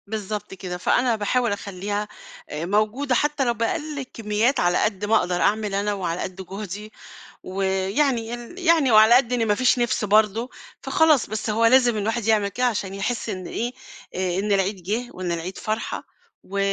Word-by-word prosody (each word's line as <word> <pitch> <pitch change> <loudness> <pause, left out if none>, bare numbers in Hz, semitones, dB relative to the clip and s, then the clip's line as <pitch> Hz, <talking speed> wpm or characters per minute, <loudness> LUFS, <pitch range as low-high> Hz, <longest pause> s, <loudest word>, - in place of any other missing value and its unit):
بالضبط 210 -1 -5
كده. 185 -2 -6
فأنا 240 +6 +2
باحاول 230 +2 0
أخلّيها 205 +1 -3 0.4
أ 155 +2 -4
موجودة 215 +8 +1
حتّى 295 0 +1
لو 240 - +2
بأقَل 285 +6 -2
كمّيات 225 +4 0
على 175 0 +2
قد 205 -1 -1
ما 220 +2 +3
أقدر 180 -4 +1
أعمل 210 -1 +1
أنا 205 +1 0
وعلى 180 -3 -3
قد 185 - -5
جهدي 205 +2 -7 0.5
ويعني 195 +7 0
ين 240 +8 -8
يعني 330 -7 +3
وعلى 220 +2 +7
قد 250 -1 +3
إن 230 -2 +1
ما 205 - +3
فيش 255 +2 +3
نِفس 240 -2 0
برضه 215 +3 +2 0.3
فخلاص، 310 -5 +3
بس 220 +1 -3
هو 225 +2 +2
لازم 240 -1 +5
الواحد 220 +2 -1
يعمل 215 -2 +3
كده 250 +6 -1
عشان 205 -5 -1
يحِس 225 +4 -3
إن 185 -3 -5
إيه، 240 +2 -3 0.4
أ 185 0 -1
إن 205 +1 -1
العيد 195 -1 0
جِه 225 +7 -2
وإن 180 -1 -4
العيد 170 +2 -4
فرحة 215 +1 -3 0.4
و 200 +1 -4
215 Hz, 175 wpm, -23 LUFS, 195-240 Hz, 0.5 s, وعلى